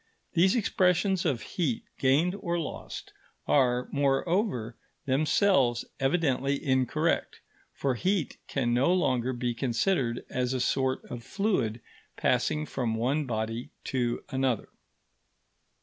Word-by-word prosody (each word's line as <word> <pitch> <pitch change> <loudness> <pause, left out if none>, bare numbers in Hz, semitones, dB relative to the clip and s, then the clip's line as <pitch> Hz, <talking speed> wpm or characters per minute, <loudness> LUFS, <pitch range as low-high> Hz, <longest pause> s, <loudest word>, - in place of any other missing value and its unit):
These 185 +3 +4
expressions 190 -4 +2
of 130 -9 0
heat 150 -10 -2 0.2
gained 145 +7 +3
or 175 -2 -1
lost 165 - -6 0.3
are, 125 -3 +3
moreover, 140 - 0 0.3
themselves 140 -2 +3
evidently 135 -1 +1
incorrect, 130 -2 +1 0.3
for 135 -2 -1
heat 185 - -1
can 120 -4 0
no 130 +7 +3
longer 130 -9 +1
be 120 -1 -2
considered 120 +1 0
as 125 0 -1
a - - -1
sort 130 +1 0
of 120 -1 -7
fluid 130 - -1 0.4
passing 150 0 +1
from 120 -6 -2
one 135 +6 0
body 115 +1 -3
to 120 -2 -1
another. 130 -4 0
135 Hz, 115 wpm, -28 LUFS, 120-170 Hz, 0.4 s, These